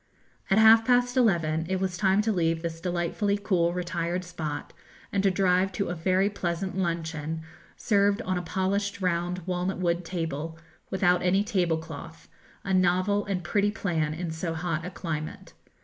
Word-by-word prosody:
At 195 Hz, -, +4 dB
half 220 Hz, +1 st, +8 dB
past 245 Hz, +1 st, +2 dB
eleven 165 Hz, -9 st, +2 dB
it 190 Hz, 0 st, 0 dB
was 190 Hz, -1 st, -1 dB
time 195 Hz, +2 st, +3 dB
to 220 Hz, -, +1 dB
leave 165 Hz, -3 st, 0 dB
this 165 Hz, -1 st, -4 dB
delightfully 180 Hz, +4 st, 0 dB
cool 180 Hz, -4 st, +1 dB
retired 175 Hz, 0 st, -2 dB
spot, 155 Hz, -4 st, -5 dB, 0.4 s
and 200 Hz, -, +2 dB
to 195 Hz, -, +4 dB
drive 185 Hz, 0 st, +2 dB
to 200 Hz, -, -2 dB
a -, -, -1 dB
very 185 Hz, +3 st, +2 dB
pleasant 185 Hz, -2 st, -3 dB
luncheon, 160 Hz, -3 st, -2 dB, 0.3 s
served 200 Hz, -1 st, +2 dB
on 185 Hz, -, -1 dB
a 180 Hz, -, -1 dB
polished 200 Hz, +3 st, -1 dB
round 180 Hz, -1 st, -1 dB
walnut 180 Hz, +1 st, -1 dB
wood 175 Hz, -1 st, 0 dB
table, 165 Hz, -2 st, -4 dB, 0.3 s
without 180 Hz, -2 st, +2 dB
any 190 Hz, +3 st, +3 dB
tablecloth, 165 Hz, -5 st, -3 dB, 0.4 s
a 195 Hz, -, -1 dB
novel 185 Hz, +3 st, +2 dB
and 185 Hz, -3 st, -2 dB
pretty 205 Hz, +5 st, +1 dB
plan 165 Hz, -8 st, -1 dB
in 170 Hz, 0 st, -4 dB
so 165 Hz, +1 st, -3 dB
hot 165 Hz, -1 st, -2 dB
a 180 Hz, -, -4 dB
climate. 155 Hz, -4 st, -5 dB
180 Hz, 165 wpm, -27 LUFS, 165-195 Hz, 0.4 s, half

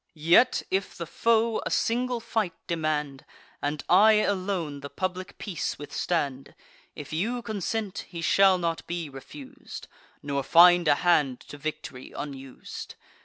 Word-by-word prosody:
Yet, 165 Hz, +10 st, +4 dB
if 190 Hz, +1 st, -1 dB
the 170 Hz, -, -4 dB
foe 230 Hz, +5 st, +1 dB
a -, -, -3 dB
single 245 Hz, +1 st, 0 dB
fight 220 Hz, -6 st, -2 dB
demand, 150 Hz, -4 st, -2 dB, 0.4 s
And 145 Hz, 0 st, -2 dB
I 210 Hz, +5 st, +6 dB
alone 185 Hz, -7 st, 0 dB
the 140 Hz, 0 st, -8 dB
public 185 Hz, +2 st, -4 dB
peace 185 Hz, -7 st, -4 dB
withstand; 145 Hz, -3 st, -3 dB, 0.4 s
If 150 Hz, 0 st, -8 dB
you 230 Hz, +9 st, -1 dB
consent, 215 Hz, -1 st, -3 dB
he 170 Hz, -2 st, -6 dB
shall 195 Hz, 0 st, +5 dB
not 170 Hz, -2 st, -3 dB
be 170 Hz, -3 st, -4 dB
refus'd, 260 Hz, -, -10 dB, 0.4 s
Nor 140 Hz, -1 st, -1 dB
find 175 Hz, +4 st, +6 dB
a 145 Hz, -, +5 dB
hand 145 Hz, -7 st, +3 dB
to 145 Hz, -, -11 dB
victory 145 Hz, -4 st, -6 dB
unus'd. 135 Hz, -2 st, -8 dB
175 Hz, 135 wpm, -27 LUFS, 150-205 Hz, 0.4 s, I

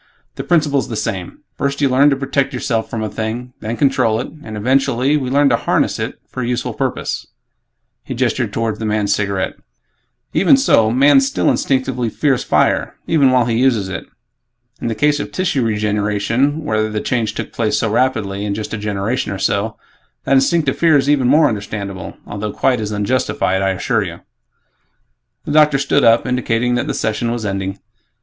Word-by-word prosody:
The -, -, -6 dB
principle's 150 Hz, -5 st, +1 dB
the 115 Hz, -, -4 dB
same; 95 Hz, -5 st, -4 dB, 0.2 s
First 140 Hz, 0 st, -1 dB
you 145 Hz, -, +3 dB
learn 135 Hz, +3 st, +4 dB
to 140 Hz, -, +2 dB
protect 135 Hz, 0 st, -1 dB
yourself 115 Hz, -2 st, -2 dB
from 110 Hz, -1 st, -3 dB
a -, -, -1 dB
thing; 115 Hz, +4 st, -5 dB
then 115 Hz, +2 st, -4 dB
control 115 Hz, -5 st, +2 dB
it; -, -, -4 dB
and, 110 Hz, -1 st, -7 dB
eventually, 130 Hz, +3 st, +2 dB
we 135 Hz, -4 st, -1 dB
learn 140 Hz, +1 st, +3 dB
to 120 Hz, -, +3 dB
'harness' -, -, 0 dB
it -, -, -4 dB
for 130 Hz, -, -6 dB
a 120 Hz, -, -2 dB
useful 125 Hz, 0 st, -2 dB
purpose." -, -, -3 dB, 0.8 s
He -, -, -6 dB
gestured -, -, 0 dB
toward 115 Hz, -1 st, -2 dB
the 110 Hz, -, -3 dB
man's 105 Hz, -1 st, +1 dB
cigarette, 100 Hz, -2 st, -2 dB, 0.8 s
"Even 230 Hz, +8 st, +5 dB
so, 115 Hz, -, +4 dB
man 135 Hz, +3 st, +5 dB
still 135 Hz, 0 st, +1 dB
instinctively 130 Hz, -3 st, 0 dB
fears 135 Hz, +2 st, 0 dB
fire -, -, +1 dB
even 145 Hz, -5 st, +3 dB
while 125 Hz, -2 st, +3 dB
he 115 Hz, -1 st, 0 dB
uses 115 Hz, -7 st, +2 dB
it. 95 Hz, -, -6 dB, 0.7 s
In -, -, -2 dB
the 115 Hz, -, -2 dB
case 145 Hz, +4 st, +2 dB
of 145 Hz, -, -5 dB
tissue 145 Hz, -4 st, 0 dB
regeneration, 105 Hz, +6 st, 0 dB
where 110 Hz, -7 st, 0 dB
the 105 Hz, 0 st, -2 dB
change 110 Hz, -2 st, -1 dB
took -, -, -5 dB
place 110 Hz, -2 st, 0 dB
so 115 Hz, -, 0 dB
rapidly, 110 Hz, -5 st, 0 dB
in 100 Hz, -1 st, -2 dB
just 110 Hz, +1 st, -5 dB
a 110 Hz, -, -3 dB
generation 105 Hz, +4 st, -2 dB
or 100 Hz, -, -3 dB
so, 100 Hz, +3 st, -1 dB, 0.5 s
that -, -, +1 dB
instinctive 135 Hz, +1 st, +2 dB
fear 165 Hz, -3 st, +5 dB
is 140 Hz, +1 st, +2 dB
even 135 Hz, -4 st, +2 dB
more 150 Hz, +3 st, +5 dB
understandable 100 Hz, -4 st, -5 dB
although 105 Hz, +1 st, -4 dB
quite 125 Hz, +2 st, +1 dB
as 105 Hz, -1 st, -3 dB
unjustified, 105 Hz, -3 st, 0 dB
I 95 Hz, -, +1 dB
assure 95 Hz, -2 st, 0 dB
you." -, -, -6 dB, 1.2 s
The -, -, -4 dB
doctor 150 Hz, -1 st, +5 dB
stood 140 Hz, +1 st, +1 dB
up, 115 Hz, 0 st, +5 dB
indicating 125 Hz, -1 st, 0 dB
that 120 Hz, -, -1 dB
the -, -, -2 dB
session 110 Hz, +2 st, -1 dB
was 120 Hz, -2 st, -3 dB
ending. 95 Hz, -1 st, -3 dB
120 Hz, 185 wpm, -18 LUFS, 105-135 Hz, 1.2 s, Even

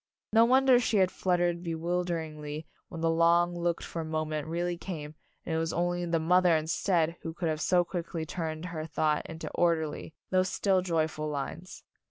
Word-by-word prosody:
No 225 Hz, +1 st, +7 dB
wonder 260 Hz, 0 st, +5 dB
she 225 Hz, -3 st, +1 dB
had 185 Hz, -1 st, +4 dB
fluttered 175 Hz, -2 st, 0 dB
bewilder 175 Hz, +1 st, -1 dB
ingly 155 Hz, -1 st, -6 dB, 0.2 s
when 165 Hz, -, -7 dB
the 165 Hz, -, +2 dB
long 170 Hz, +1 st, +3 dB
looked 170 Hz, 0 st, -1 dB
for 165 Hz, -, -4 dB
moment 155 Hz, -1 st, -2 dB
really 175 Hz, +2 st, -1 dB
came, 155 Hz, -4 st, -6 dB, 0.3 s
and 165 Hz, -, -3 dB
it 160 Hz, -, +1 dB
was 165 Hz, 0 st, -1 dB
only 175 Hz, +1 st, 0 dB
the 170 Hz, 0 st, +1 dB
mother 175 Hz, +1 st, +4 dB
instead 165 Hz, +1 st, 0 dB
who 165 Hz, 0 st, -6 dB
could 170 Hz, -2 st, -1 dB
have 155 Hz, 0 st, -2 dB
so 180 Hz, 0 st, +3 dB
quickly 170 Hz, -2 st, -4 dB
turned 160 Hz, 0 st, -4 dB
her 160 Hz, -3 st, -5 dB
thought 150 Hz, -1 st, +1 dB
into 160 Hz, 0 st, -7 dB
orderly, 160 Hz, -2 st, 0 dB, 0.2 s
though 185 Hz, 0 st, +4 dB
still 185 Hz, 0 st, +1 dB
joyful 160 Hz, -3 st, -1 dB
lines. 150 Hz, +5 st, -6 dB
170 Hz, 180 wpm, -29 LUFS, 160-175 Hz, 0.3 s, No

